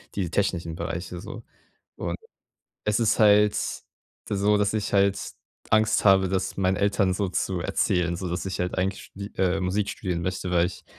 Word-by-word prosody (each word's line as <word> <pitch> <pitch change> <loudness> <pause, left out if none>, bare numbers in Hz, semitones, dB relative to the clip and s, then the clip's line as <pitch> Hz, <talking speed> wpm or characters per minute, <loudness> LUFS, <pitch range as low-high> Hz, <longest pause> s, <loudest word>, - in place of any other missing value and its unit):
die 95 -4 -1
technischen 85 -4 -1
Bereiche 85 +1 -5
so - - -8 0.5
und - - -3 0.7
es 105 +2 +1
ist 115 - +2
halt 105 -1 +5 0.8
so, 105 +1 +2
dass 100 0 +1
ich 105 -2 -2
halt 100 0 +3 0.5
Angst 110 0 +3
habe, 95 -2 +5
das 95 0 -2
meinen 95 -1 +2
Eltern 100 -1 +2
so 100 0 -1
zu 90 0 -1
erzählen, 90 -2 0
so 90 +1 -4
dass 90 +2 -3
ich 95 - -3
halt 90 +1 -2
eigentlich 95 +1 -2
die, 100 +1 -8
äh, 95 +1 +1
Musik 95 +3 0
studieren 90 -4 -3
möchte, 95 +1 -3
weil 85 -1 +3
ich 90 - -8
95 Hz, 175 wpm, -25 LUFS, 90-100 Hz, 0.8 s, halt